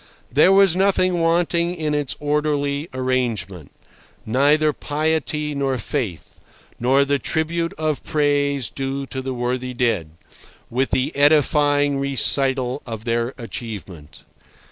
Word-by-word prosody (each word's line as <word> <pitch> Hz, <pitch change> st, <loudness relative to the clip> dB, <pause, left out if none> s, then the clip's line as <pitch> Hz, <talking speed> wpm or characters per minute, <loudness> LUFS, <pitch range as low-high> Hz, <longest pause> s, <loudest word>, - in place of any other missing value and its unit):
There 150 Hz, +8 st, +5 dB
was 195 Hz, -3 st, +5 dB
nothing 185 Hz, -2 st, +2 dB
wanting 170 Hz, +1 st, +1 dB
in 155 Hz, -3 st, -2 dB
its 145 Hz, -3 st, -1 dB
orderly 145 Hz, 0 st, -1 dB
arrangement—neither 130 Hz, -, -1 dB
piety 150 Hz, 0 st, -1 dB
nor 135 Hz, -2 st, -1 dB
faith, 110 Hz, -, -4 dB, 0.4 s
nor 135 Hz, +3 st, +3 dB
the 140 Hz, 0 st, +1 dB
tribute 165 Hz, +2 st, -1 dB
of 155 Hz, -2 st, -2 dB
praise 145 Hz, -3 st, +1 dB
due 135 Hz, 0 st, -4 dB
to 130 Hz, 0 st, -5 dB
the 130 Hz, -1 st, -4 dB
worthy 125 Hz, +1 st, -3 dB
dead, 115 Hz, -10 st, 0 dB, 0.6 s
with 130 Hz, +3 st, 0 dB
the 130 Hz, +4 st, -1 dB
edifying 145 Hz, -1 st, +3 dB
recital 135 Hz, -1 st, +1 dB
of 110 Hz, -1 st, -7 dB
their 115 Hz, +2 st, -1 dB
achievement. 105 Hz, -, -8 dB
140 Hz, 115 wpm, -21 LUFS, 125-150 Hz, 0.6 s, There